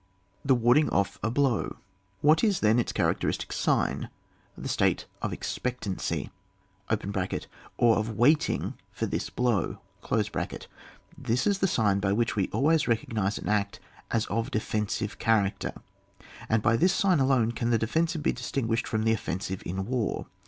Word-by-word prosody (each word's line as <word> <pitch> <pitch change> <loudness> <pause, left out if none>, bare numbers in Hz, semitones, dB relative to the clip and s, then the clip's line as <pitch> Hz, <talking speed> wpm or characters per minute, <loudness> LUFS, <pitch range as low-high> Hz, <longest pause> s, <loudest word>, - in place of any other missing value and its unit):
The 135 -1 +4
warding 120 +6 +4
off 100 0 0
a 110 - 0
blow. 130 -1 +1 0.5
What 155 +2 +4
is 205 -5 +2
then 110 +2 +4
its 120 - -1
characteristic - - 0
fiign? - - 0 0.5
The - - -5
state - - +1 0.2
of - - -2
ex - - -4
pectancy 120 -7 -3 1.5
(or 115 -2 +4
of 110 0 -2
waiting 150 +6 +3 0.2
for - - -2
this - - -3
blow). 120 -4 0 1.4
This 120 +3 -1
is 200 -1 +2
the 195 - +3
sign 105 - +2
by 100 0 +1
which 115 +2 0
we 100 -3 +1
always 155 +2 +2
recognise 110 -3 0
an - - -6
act 105 -1 0 0.3
as 115 -2 +1
of 115 +2 -1
a - - -8
defensive 105 -3 -2
cha 115 - +3
racter, 95 - -4 0.7
and 110 -1 +2
by 115 - +4
this 180 +6 +3
sign 185 -5 +3
alone 130 -4 +3
can 115 0 -2
the 115 - +4
defensive 160 +8 0
be - - +2
disting^shed 120 -2 -2
from 110 -2 -1
the 110 0 +3
offen 95 -4 -2
sive 95 -1 -4
in 95 +3 -3
war. 120 -1 -1
115 Hz, 160 wpm, -28 LUFS, 105-135 Hz, 1.5 s, The